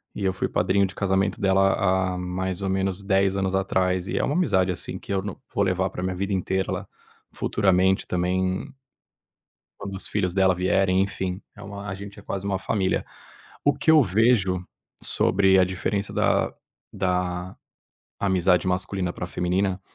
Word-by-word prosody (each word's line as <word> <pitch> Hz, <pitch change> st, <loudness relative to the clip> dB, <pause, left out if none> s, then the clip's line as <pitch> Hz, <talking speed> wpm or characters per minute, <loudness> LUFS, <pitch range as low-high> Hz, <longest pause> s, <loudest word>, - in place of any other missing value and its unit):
e 100 Hz, -, -4 dB
eu 95 Hz, -, +2 dB
fui -, -, -1 dB
padrinho 95 Hz, +2 st, +2 dB
de 95 Hz, -, -11 dB
casamento 95 Hz, 0 st, 0 dB
dela 95 Hz, 0 st, +3 dB
há 95 Hz, -1 st, +1 dB
há -, -, -4 dB
mais 90 Hz, +1 st, -3 dB
ou 95 Hz, -, -1 dB
menos 95 Hz, 0 st, -1 dB
10 95 Hz, 0 st, +2 dB
anos 95 Hz, -1 st, 0 dB
atrás. 95 Hz, -1 st, 0 dB
E -, -, -2 dB
é -, -, +1 dB
uma 145 Hz, -, 0 dB
amizade, 95 Hz, -, +2 dB
assim, 85 Hz, -, -5 dB
que 100 Hz, -, -6 dB
eu 95 Hz, -, +1 dB
no 100 Hz, -2 st, -6 dB
vou 100 Hz, -, +2 dB
levar 95 Hz, 0 st, +1 dB
pra 90 Hz, -, -6 dB
minha 90 Hz, 0 st, -2 dB
vida 100 Hz, +2 st, -2 dB
inteira. 95 Hz, +1 st, 0 dB
Ela 95 Hz, +1 st, -3 dB, 0.4 s
futuramente 95 Hz, -2 st, +2 dB
também 95 Hz, +7 st, -1 dB, 1.1 s
quando 100 Hz, -1 st, -6 dB
os 95 Hz, -, -2 dB
filhos 95 Hz, -3 st, -1 dB
dela 95 Hz, -1 st, +4 dB
vierem, 95 Hz, +1 st, +2 dB
enfim, 95 Hz, -1 st, -3 dB, 0.2 s
é 105 Hz, -, -11 dB
uma 100 Hz, 0 st, -8 dB
a 95 Hz, -, -3 dB
gente 100 Hz, +1 st, -9 dB
é -, -, -11 dB
quase 100 Hz, -1 st, -4 dB
uma 95 Hz, -2 st, 0 dB
família. 95 Hz, -1 st, 0 dB, 0.6 s
O 145 Hz, 0 st, +4 dB
que 150 Hz, +3 st, +1 dB
eu 155 Hz, -2 st, +7 dB
vejo 95 Hz, -3 st, +2 dB, 0.4 s
sobre 95 Hz, -1 st, +3 dB
a 90 Hz, -, +6 dB
diferença 100 Hz, +2 st, -2 dB
da -, -, +1 dB, 0.4 s
da 90 Hz, -1 st, -2 dB, 0.7 s
amizade 95 Hz, -2 st, +2 dB
masculina 90 Hz, 0 st, -1 dB
pra 90 Hz, -, -5 dB
feminina, 95 Hz, +2 st, -1 dB
95 Hz, 180 wpm, -24 LUFS, 90-100 Hz, 1.1 s, eu